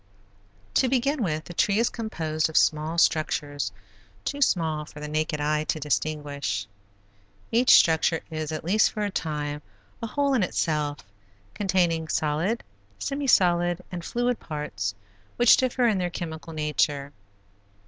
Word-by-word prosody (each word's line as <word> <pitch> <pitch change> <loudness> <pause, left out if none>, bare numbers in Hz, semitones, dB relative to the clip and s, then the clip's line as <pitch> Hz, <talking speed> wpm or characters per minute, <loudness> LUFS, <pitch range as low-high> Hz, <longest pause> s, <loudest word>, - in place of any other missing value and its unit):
To 260 - +3
begin 270 +2 +1
with, 155 -6 -1
the 175 - -9
tree 200 +4 +2
is 230 +1 +2
composed 160 -9 -2
of 160 - -1
small 155 +2 +2
structures, 145 -7 +1 0.5
too 285 - -3
small 160 - +1
for 150 0 -12
the 150 - -5
naked 155 0 -1
eye 150 +1 +1
to 155 - -1
distinguish. 145 -7 -2 0.9
Each 240 +2 +6
structure 160 0 +4
is, 155 -1 -3
at 155 - -4
least 205 +6 +3
for 210 - -2
a 205 - -1
time, 150 -4 -3 0.4
a 230 - -3
whole 280 +3 +1
in 250 - +3
itself, 150 -5 -1 0.5
containing 180 -5 +1
solid, 155 +10 0 0.3
semi 280 0 -3
solid, 175 -4 +3
and 175 -2 -5
fluid 245 +4 -1
parts 100 -11 -4 0.4
which 240 -1 +7
differ 255 -1 +1
in 210 -4 +2
their 180 -1 -1
chemical 165 -1 -6
nature. 150 -2 0
160 Hz, 145 wpm, -26 LUFS, 150-210 Hz, 0.9 s, which